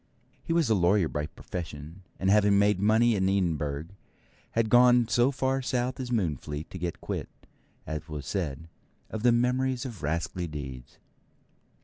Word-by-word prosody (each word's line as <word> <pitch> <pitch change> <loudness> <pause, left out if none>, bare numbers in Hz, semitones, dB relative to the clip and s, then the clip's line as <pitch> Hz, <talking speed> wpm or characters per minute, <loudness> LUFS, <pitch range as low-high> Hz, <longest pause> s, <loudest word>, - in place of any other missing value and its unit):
He - - -4
was 165 -4 +3
a 115 - +3
lawyer 95 -1 +3
by 75 -1 -3
profession, 80 0 -8 0.2
and 95 0 +2
having 100 -1 +5
made 100 -1 +3
money 110 +3 +4
in 95 -1 +1
Edinburgh, 80 -5 -1 0.6
had 115 -2 +1
gone 120 -1 +6
so 120 +3 +3
far 135 0 0
south 125 0 -1
as 130 -2 -4
Moonfleet 75 - -2
to 95 - -7
get 85 0 -4
quit, - - -4 0.6
as 75 0 -5
was 75 -3 -6
said, 80 -4 -3 0.4
of 110 - -4
the 120 +1 +5
memories 125 +2 +1
of 115 -8 -7
rascally 80 +3 -2
deeds. 65 -5 -8
100 Hz, 155 wpm, -28 LUFS, 80-120 Hz, 0.6 s, gone